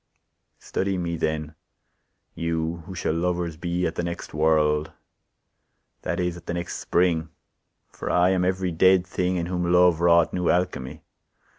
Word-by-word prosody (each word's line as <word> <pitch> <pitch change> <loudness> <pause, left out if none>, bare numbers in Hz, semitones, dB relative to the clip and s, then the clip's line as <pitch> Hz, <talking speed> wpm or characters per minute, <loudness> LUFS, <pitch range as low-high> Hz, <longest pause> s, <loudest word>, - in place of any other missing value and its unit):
Study 95 0 -2
me 85 -1 -2
then, 80 -1 -2 0.8
you 85 0 -2
who 95 - -7
shall 85 - -1
lovers 85 -1 -1
be 85 +2 -2
At 80 - -1
the 85 - -3
next 85 0 -5
world, 75 0 +2 1.1
that - - -2
is, 90 -1 -1
at 85 -1 -13
the 85 - -2
next 85 0 -4
spring; 85 -2 +1 0.6
For - - -6
I 90 +1 +4
am 95 -1 +1
every 95 0 0
dead 95 +2 +4
thing, 90 0 -1
In 85 -2 -1
whom 90 0 -1
Love 90 -2 +5
wrought 85 -1 +4
new 90 -2 0
alchemy. 90 -8 -1
85 Hz, 155 wpm, -25 LUFS, 80-90 Hz, 1.1 s, Love